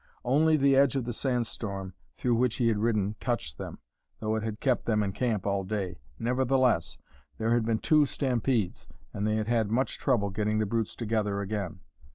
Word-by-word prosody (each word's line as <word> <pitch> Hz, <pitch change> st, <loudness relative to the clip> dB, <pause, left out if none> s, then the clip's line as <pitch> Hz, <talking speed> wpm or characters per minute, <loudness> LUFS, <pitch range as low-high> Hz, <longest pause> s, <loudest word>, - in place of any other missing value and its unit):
Only 155 Hz, +5 st, +4 dB
the 140 Hz, -1 st, +4 dB
edge 135 Hz, -1 st, +4 dB
of 130 Hz, -3 st, -1 dB
the 120 Hz, -, -3 dB
sand 125 Hz, 0 st, 0 dB
storm 100 Hz, -4 st, -5 dB, 0.2 s
through 125 Hz, -, +1 dB
which 120 Hz, 0 st, +2 dB
he 120 Hz, -2 st, +2 dB
had 110 Hz, -2 st, +1 dB
ridden 105 Hz, -2 st, +1 dB
touched 80 Hz, -, -2 dB
them, -, -, -6 dB, 0.4 s
though 110 Hz, 0 st, -1 dB
it 110 Hz, -, -1 dB
had 110 Hz, 0 st, -4 dB
kept 130 Hz, -3 st, +1 dB
them 105 Hz, -2 st, +2 dB
in 100 Hz, -, -1 dB
camp 110 Hz, -2 st, -1 dB
all 100 Hz, -1 st, 0 dB
day. 95 Hz, -2 st, -3 dB, 0.2 s
Nevertheless, 125 Hz, -6 st, +1 dB, 0.4 s
there 110 Hz, +1 st, 0 dB
had 120 Hz, -2 st, +2 dB
been 115 Hz, -1 st, +1 dB
two 150 Hz, +4 st, +4 dB
stampedes, 125 Hz, -7 st, -1 dB, 0.3 s
and 100 Hz, +1 st, -1 dB
they 110 Hz, -, +1 dB
had 110 Hz, -1 st, 0 dB
had 115 Hz, -2 st, +1 dB
much 125 Hz, +5 st, 0 dB
trouble 105 Hz, -7 st, +1 dB
getting 105 Hz, +2 st, 0 dB
the 110 Hz, -, +2 dB
brutes 115 Hz, +1 st, -1 dB
together 105 Hz, -3 st, -1 dB
again. 100 Hz, -3 st, -4 dB
110 Hz, 200 wpm, -29 LUFS, 105-125 Hz, 0.4 s, Only